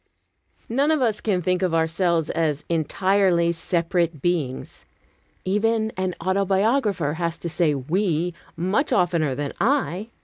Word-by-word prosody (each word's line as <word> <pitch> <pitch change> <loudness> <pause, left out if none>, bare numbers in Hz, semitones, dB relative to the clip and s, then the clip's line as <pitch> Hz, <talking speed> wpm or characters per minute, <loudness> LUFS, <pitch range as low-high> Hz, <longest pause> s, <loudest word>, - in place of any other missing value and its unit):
None 275 +6 +1
of 315 -1 +3
us 225 -5 0
can 185 -5 0
think 180 +2 +1
of 180 -3 +1
ourselves 165 0 +1
as 150 -3 -1
entirely 170 +1 +2
separate 170 -1 -1
beings. 150 -5 -2 0.6
Even 220 +3 +1
an 185 -1 -2
autobiographer 195 - +1
has 170 -1 -2
to - - -5
say 160 -3 +1
"we" 170 +4 -1 0.2
much 190 - 0
oftener 170 -6 +1
than 145 0 -3
"I." 225 -5 0
180 Hz, 130 wpm, -23 LUFS, 165-200 Hz, 0.6 s, of